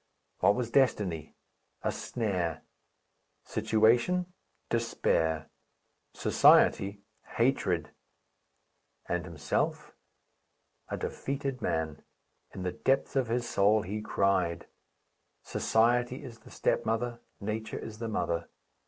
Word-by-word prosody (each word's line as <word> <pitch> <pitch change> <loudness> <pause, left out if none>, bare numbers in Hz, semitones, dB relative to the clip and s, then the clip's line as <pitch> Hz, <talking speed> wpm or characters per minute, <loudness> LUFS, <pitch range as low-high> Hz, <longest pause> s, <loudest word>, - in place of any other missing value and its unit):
What 100 - +5
was 120 -2 -2
destiny? 105 - +1 0.5
A - - +1
snare. 95 -9 -2 0.8
Situation? 125 +12 +2 0.3
Despair. 80 -9 0 0.6
Society? 100 +1 +4 0.3
Hatred. 95 - +1 1.2
And 90 0 -1
himself? 85 -4 -2 1.0
A - - -2
defeated 135 -1 -3
man. 80 -2 -1 0.5
In 95 - -7
the 90 - -1
depths 135 +7 0
of 130 -3 +2
his 120 +1 -1
soul 105 +2 +3
he 105 +4 -4
cried. 95 -5 +1 0.8
Society 120 +3 +1
is 115 -4 -10
the 110 - -16
stepmother, 115 +1 0 0.2
Nature 110 +2 -3
is 110 -1 -8
the 115 - -3
mother. 85 -4 -1
110 Hz, 95 wpm, -30 LUFS, 90-120 Hz, 1.2 s, What